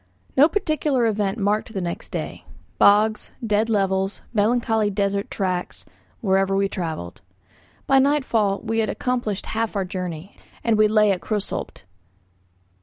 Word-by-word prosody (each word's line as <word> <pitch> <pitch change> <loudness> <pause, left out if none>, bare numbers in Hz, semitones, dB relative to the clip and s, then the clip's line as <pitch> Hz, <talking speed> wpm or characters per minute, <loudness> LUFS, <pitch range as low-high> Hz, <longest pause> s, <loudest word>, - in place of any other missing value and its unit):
No 290 +4 +6
particular 310 - 0
event 210 -2 0
marked 210 +1 0
the - - 0
next 175 -2 -4
day. - - -5 0.4
Bogs, 210 +1 +4 0.2
dead 215 +1 +1
levels, 195 -2 0
melancholy 225 0 +2
desert 200 0 -1
tracks, 185 -3 -3 0.4
wherever 195 -2 +2
we 195 0 +2
travelled. 160 - -5 0.6
By 270 0 +5
nightfall 255 -8 +1
we 225 0 -1
had 220 - +1
accomplished 240 -6 -2
half 225 -1 -2
our 195 -2 0
journey, 180 0 -6 0.3
and 230 -2 +3
we 215 0 +5
lay 210 -1 +4
at 180 -3 -1
Krösolbt. 210 +1 -4
210 Hz, 135 wpm, -23 LUFS, 195-225 Hz, 0.6 s, No